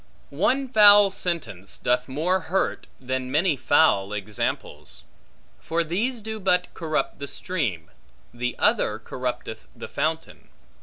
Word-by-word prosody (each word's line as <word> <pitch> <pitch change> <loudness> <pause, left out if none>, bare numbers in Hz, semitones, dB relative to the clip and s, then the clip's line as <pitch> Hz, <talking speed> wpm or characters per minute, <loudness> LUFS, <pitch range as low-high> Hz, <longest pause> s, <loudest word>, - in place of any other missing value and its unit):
One 255 - +1
foul 205 -4 +7
sentence 170 - -3
doth 125 +1 0
more 160 +8 0
hurt, 185 +2 -2
than 130 0 -3
many 155 +4 +2
foul 105 -7 +3
examples. 75 - -5 0.6
For 170 +1 -1
these 220 +9 -2
do 220 +1 -6
but 180 -2 +1
corrupt 155 -4 -2
the 140 - -5
stream, 120 - -3 0.4
the 125 +1 -3
other - - +2
corrupteth 60 - -5
the - - -8
fountain. - - -3
160 Hz, 120 wpm, -24 LUFS, 125-190 Hz, 0.6 s, foul